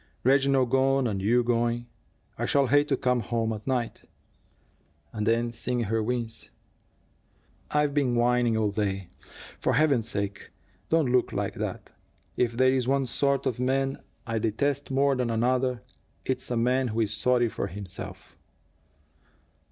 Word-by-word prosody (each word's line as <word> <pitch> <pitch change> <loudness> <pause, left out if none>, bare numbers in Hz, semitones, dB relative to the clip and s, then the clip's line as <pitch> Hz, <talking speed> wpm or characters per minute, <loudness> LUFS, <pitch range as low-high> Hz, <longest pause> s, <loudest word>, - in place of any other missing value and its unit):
"Reginald 135 -1 +3
gone, 135 0 +3
and 100 -5 -1
you 120 +5 +3
going! 120 0 0 0.5
I - - -2
shall 140 -1 +3
hate 145 +3 +3
to 135 - +1
come 125 -1 +1
home 115 0 -1
at 105 +2 -8
night." 125 -3 -1 1.1
And 105 -1 -2
then, 115 +1 +2
seeing 120 +1 -2
her 115 0 0
wince: 115 0 -3 1.2
"I've 150 -1 +1
been 135 -4 +1
whining 120 -1 +2
all 105 -2 +1
day. 100 -3 -2 0.5
For - - +1
Heaven's 135 -7 +2
sake, 100 -1 -4 0.4
don't 160 -6 +2
look 125 -1 +2
like - - -2
that. - - -5 0.4
If 120 -1 0
there's 130 -1 +3
one 135 0 +2
sort 140 +2 0
of 125 -3 -1
man 135 +1 0 0.3
I 115 -1 -1
detest 140 +6 -1
more 135 +1 +2
than 125 -2 -1
another, 125 +1 0 0.4
it's 130 - -2
a 120 - -1
man 125 +2 +2
who 115 0 -1
is 110 -1 0
sorry 120 +2 +2
for 105 - -3
himself. 100 -1 -9
125 Hz, 150 wpm, -27 LUFS, 115-135 Hz, 1.2 s, Reginald